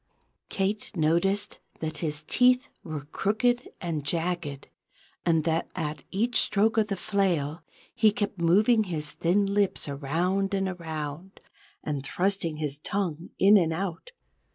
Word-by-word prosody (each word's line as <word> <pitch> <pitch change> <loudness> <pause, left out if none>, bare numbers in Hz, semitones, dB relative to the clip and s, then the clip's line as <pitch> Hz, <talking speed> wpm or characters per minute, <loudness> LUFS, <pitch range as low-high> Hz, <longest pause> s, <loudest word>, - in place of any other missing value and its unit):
Kate 200 +2 -1
noticed 190 +6 +1 0.2
that 155 -1 -4
his 150 -2 -3
teeth 250 +9 +3
were 155 -3 -5
crooked 240 - 0
and 165 -5 -3
jagged, 165 -2 -2 0.6
and 165 -2 +3
that 165 +1 0
at 150 -3 -4
each 225 +4 +1
stroke 215 +2 +2
of 215 - +2
the 200 - -1
flail, 175 -6 0 0.3
he 215 - +4
kept 205 -4 -3
moving 210 +7 +4
his 155 -5 -4
thin 190 +4 +2
lips 200 -3 +1
around 175 +8 0
and 195 0 0
around, 165 0 -6 0.4
and 145 -3 -3
thrusting 180 +1 0
his 150 -2 -3
tongue 175 -2 -3
in 205 +2 +7
and 165 -4 +2
out. 185 - -4
175 Hz, 135 wpm, -27 LUFS, 155-200 Hz, 0.6 s, in